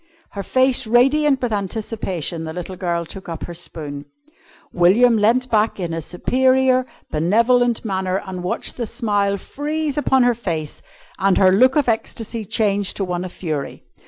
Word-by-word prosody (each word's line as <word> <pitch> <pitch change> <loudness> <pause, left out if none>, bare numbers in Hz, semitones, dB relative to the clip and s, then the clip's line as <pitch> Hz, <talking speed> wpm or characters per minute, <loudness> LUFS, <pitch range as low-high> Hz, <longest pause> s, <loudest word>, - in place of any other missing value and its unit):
Her 200 - -5
face 255 +3 +2
radiant 270 +4 +3
with 235 -3 0
anticipation, 195 -5 -3
the 160 - -6
little 180 +2 -6
girl 170 -2 -2
took 190 +2 -9
up 165 -2 -6
her 175 - -6
spoon. 150 -4 -7 0.7
William 210 +8 +5
leant 235 +4 +2
back 215 -1 +1
in 170 -3 -3
a 165 - -3
superior, 255 - +2 0.2
benevolent 235 +9 +2
manner 190 -2 -1
and 185 -2 -6
watched 180 - -2
the 235 -3 -3
smile 205 -4 0
freeze 295 +5 -3
upon 265 -3 +3
her 245 0 +4
face 165 -10 -4 0.4
and 195 0 +3
her 185 -1 +5
look 255 +7 +4
of 295 -4 +2
ecstasy 225 -1 -2
change 200 -1 0
to 195 - -1
one 180 -1 -3
of 185 - -6
fury. 155 -7 -5
205 Hz, 160 wpm, -20 LUFS, 180-245 Hz, 0.7 s, William